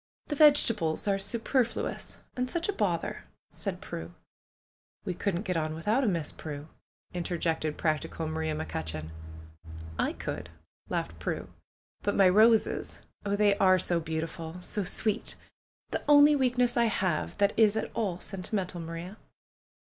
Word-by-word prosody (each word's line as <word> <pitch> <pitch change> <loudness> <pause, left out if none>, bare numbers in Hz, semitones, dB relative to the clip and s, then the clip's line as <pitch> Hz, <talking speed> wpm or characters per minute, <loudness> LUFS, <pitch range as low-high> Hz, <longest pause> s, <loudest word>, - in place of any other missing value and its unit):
The 295 - -1
vegetables 230 - +5
are 195 -1 +2
superfluous, 235 +4 -1 0.2
and 250 0 -1
such 340 +3 0
a 410 - 0
bother!" - - -1 0.3
said - - -5
Prue. - - -7 0.9
"We 185 - -1
couldn't 180 +1 -2
get 185 -4 -2
on 155 -1 -1
without 210 +11 +1
'em, 210 -6 +2
Miss 165 -3 -2
Prue 145 -1 -7 0.2
!" - - -38
inter 175 0 -2
jected 160 -2 -1
practical 155 0 -1
Maria 160 0 -2
McCutcheon. 80 - -4 0.9
"I - - +1
could," 80 +1 -5 0.4
laughed 85 0 -3
Prue. - - -3 0.5
"But 205 - 0
my 195 -2 +6
roses! 220 +4 +3 0.2
Oh, 200 - +1
they 205 -1 +4
are 185 -1 +5
so 175 -1 +2
beautiful! 160 +1 -4
So 205 +2 0
sweet! 215 +4 -1 0.6
The - - -1
only 295 0 +7
weakness 250 -2 +2
I 235 -1 +4
have 185 -7 -1
that 200 0 +3
is 220 -1 +4
at - - -2
all 200 -6 -1
sentimental, 185 -2 -4
Maria 165 +5 -7
185 Hz, 150 wpm, -29 LUFS, 160-225 Hz, 0.9 s, only